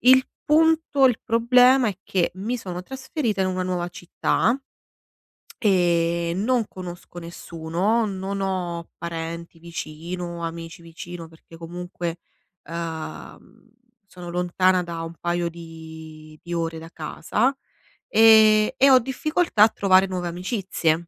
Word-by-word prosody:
Il 260 +1 +6 0.2
punto 315 -3 +4
il 245 -3 +1
problema 250 +2 +5
è 195 -2 -5
che 180 -3 0
mi 220 +6 -2
sono 180 -5 -6
trasferita 260 - -2
in 185 - +1
una 185 0 -1
nuova 180 -1 -2
città 180 +7 0 1.0
e 170 -4 +2
non 230 +3 +1
conosco 175 -1 -9
nessuno, 170 +6 -1
non 195 0 -4
ho 175 -3 -3
parenti 170 0 -6
vicino, 170 +1 -6
amici 165 +1 -6
vicino 170 0 -9
perché 160 0 -16
comunque, 175 0 -5 0.5
uhm, 165 +6 -7 0.4
sono 180 -2 -10
lontana 180 +1 +2
da 170 -1 -5
un 165 0 -6
paio 175 0 -1
di 160 -2 -11
di 175 - -6
ore 165 -1 -2
da 165 +1 -10
casa, 210 - -1 0.5
e 220 -1 +6
e 275 - +6
ho 255 - +8
difficoltà 265 -1 +1
a 220 - +7
trovare 190 -2 +4
nuove 180 -2 -3
amicizie. 175 -3 -1
180 Hz, 125 wpm, -24 LUFS, 170-215 Hz, 1.0 s, ho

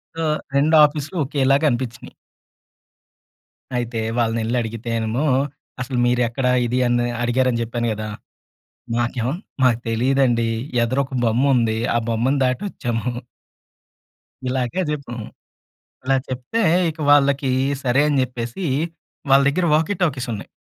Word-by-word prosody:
So, 165 - -3 0.3
2 155 +3 +4
ఆఫీసులు 150 +4 -4
ఒకేలాగా 140 +1 +2
అనిపించినీయి. 120 -2 -4 1.6
అయితే 120 -1 -2 0.2
వాళ్ళని 115 -1 +1
వెళ్లి 120 +3 -1
అడిగితేనేమో, 115 +3 -2 0.6
అసలు 125 0 -3
మీరెక్కడ 125 +1 +1 0.2
ఇది 125 +2 0
అని 120 0 +1 0.2
అడిగారని 120 0 +1
చెప్పాను 120 +1 -2
కదా! 110 0 -5 0.9
మాకేమో 120 +1 -1 0.3
మాకు 120 -2 +4
తెలీదండి 120 0 +2 0.4
ఎదురొక 130 +3 -1
బొమ్ముంది 115 -1 +2 0.2
ఆ - - -1
బొమ్మను 120 +5 +1
దాటొచ్చాము. 125 - -2 1.4
ఇలాగే 130 +6 -1
జెప్పాం. 140 -5 -4 0.9
ఇలా 135 +1 +2
చెప్తే, 130 - -2 0.3
ఇక 160 - -12
వాళ్ళకి 140 -1 +3 0.3
సరే 130 +3 +3
అని 145 -2 +1
జెప్పేసి 125 +7 -4 0.7
వాళ్ళ 140 +1 +7
దగ్గర 175 +5 +1
వాకీ 160 +6 +2
టాకీస్ 135 -7 0
ఉన్నాయి. 105 - -6
125 Hz, 110 wpm, -21 LUFS, 120-140 Hz, 1.6 s, వాళ్ళ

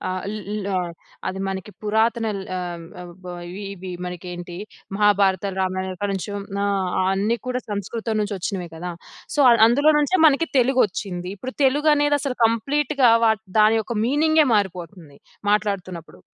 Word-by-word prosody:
ఆహ్, 185 - -5
ల్ 205 -1 -5
ఆహ్, 175 -1 -2 0.4
అది 190 - -3
మనకి 190 +1 -5
పురాతన 225 +2 +1
ల్ 195 - -6
ఆహ్, 175 -2 -5 0.4
వ - - -14 0.2
ఇవి 200 +3 -7
ఇవి 185 -1 -9 0.2
మనకేంటి? 175 0 -7 0.4
మహాభారతాలు, 200 -2 +2
రామాయణం 185 0 -2
కాడి 205 -1 0
నుంచి 195 +2 -4
వున్నా, 200 0 -3 0.5
అన్ని 210 +5 0
కూడా 250 0 -1
సంస్కృతం 220 +2 -3
నుంచి 205 0 -2
వచ్చినవే 185 -1 -4
కదా! 175 +2 -5 0.4
సో - - -1
అ - - +7 0.2
అందులోనుంచే 295 +7 +3
మనకి 305 +3 +2
తెలుగొచ్చింది. 205 -8 +1
ఇప్పుడు 255 +6 -6
తెలుగనేది 290 +1 +3
అసలు 270 -3 -3
కంప్లీట్‌గా 275 +3 +2 0.2
వా 220 - +6 0.3
దాని 215 +1 +5
యొక్క 230 +2 -5
మీనింగే 310 +4 +3
మారిపోతుంది. 175 -6 -3 0.3
మాట్లాడుతున్నప్పుడు. 195 -5 -2
205 Hz, 140 wpm, -22 LUFS, 185-250 Hz, 0.5 s, అ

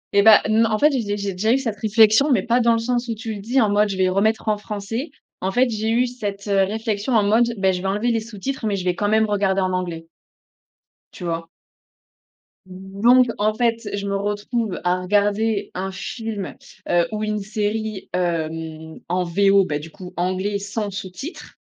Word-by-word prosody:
Eh 200 - +7
bah, 220 +1 +8
non. 220 +1 +3
En 215 - +1
fait 300 +6 +4
j'ai 255 -4 0
dé 205 0 -2
j'ai 200 -1 -2
déjà 210 +5 +1
eu 255 - +4
cette 230 -6 -3
réflexion, 220 +6 +4
mais 215 -8 +3
pas 240 +1 +2
dans 235 -1 +4
le - - +2
sens 245 +1 -1
où 230 - -2
tu 220 +1 -5
le 205 - -7
dis, 240 +6 +1
en 220 -4 +3
mode: 210 +1 +3
«Je 195 - -3
vais 185 -1 +3
remettre 215 +4 +1
en 215 -1 +2
français». 210 +7 -5 0.3
En 190 - -1
fait 250 +5 +3
j'ai 220 0 -2
eu 240 +2 +3
cette 205 -5 -5
heu 195 -1 +3
réflexion 215 +3 -2
en 215 - +4
mode: 230 +4 +3
«Bah 190 -1 +2
je 180 -1 -3
vais 190 - -2
enlever 210 +5 0
les 230 - +1
sous-titres 230 +3 -5
mais 205 - 0
je 185 -2 -4
vais 180 - +2
quand 205 +2 -1
même 220 +1 +3
regarder 195 -2 +1
en 185 0 0
anglais». 170 -3 -3 1.1
Tu - - -10
vois? 165 -1 -3 1.2
Donc, 195 +7 +2
en 215 +1 +2
fait, 230 -1 0
je 200 0 -3
me 200 - -1
retrouve 205 +1 -2
à 180 +1 +1
regarder 205 +2 +1
un 190 +1 -3
film, 210 +1 -5 0.3
heu, 175 -1 +3
ou 215 0 -3
une 215 0 -1
série, 210 0 -3
hem, 160 -2 -3
en 180 +1 +1
VO, 195 +2 +4
bah 150 -4 -2
du 160 +2 -10
coup 180 +1 -11
anglais 185 +3 -1
sans 205 +1 -3
sous-titres. 195 - -8
205 Hz, 210 wpm, -22 LUFS, 190-225 Hz, 1.2 s, bah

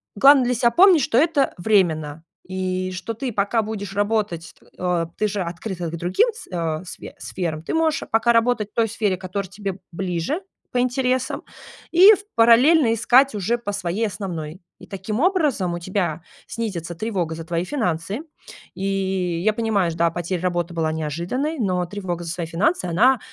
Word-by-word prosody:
главное 270 +3 +6
для 250 - +1
себя 235 +1 +3
помнить, 355 +4 +6
что 230 - +1
это 295 -1 +3
временно, 165 -6 +1 0.2
и 185 0 -2
что 185 +5 -4
ты 245 +3 -4
пока 205 +3 +1
будешь 205 -3 -5
работать, 205 -6 -1 0.2
э, 180 -2 0
ты 215 - +1
же 205 -1 -3
открыта 175 0 -4
к 170 - -5
другим 180 - +2
с 450 - -11
э, 165 -2 -3
сф - - -10 0.2
сферам, 165 -4 -4
ты - - -4
можешь 320 -1 +1
пока 225 +2 +3
работать 230 -2 +1
в - - -62
той 230 -1 +2
сфере, 205 -3 0
которая 185 +1 -5
тебе 195 -1 -5
ближе 180 - -2 0.3
по 250 - 0
интересам, 255 +1 0 0.5
и 370 +5 +9
ф - - -1 0.2
параллельно 235 +3 +5
искать 250 +3 +4
уже 210 +4 0
по 235 -4 -5
своей 200 +3 -1
основной. 180 -5 -6 0.2
И - - -13
таким 200 +3 -4
образом 300 - +1
у 175 - -4
тебя 175 -3 -2 0.2
снизится 175 -7 -4
тревога 180 -5 -2
за 165 - -7
твои 170 +1 -2
финансы. 200 - -2 0.5
И 195 - -4 0.6
я 215 - +4
понимаю, 215 -6 0
ж - - -7
да, 170 0 +2
потеря 175 +1 -3
работы 175 -1 -1
была 160 -2 0
неожиданной, 170 - -3
но 185 -5 0
тревога 175 -2 -5
за 165 - -4
свои 170 -1 -4
финансы, 185 - 0
она, 230 +9 +3
200 Hz, 175 wpm, -22 LUFS, 175-235 Hz, 0.6 s, и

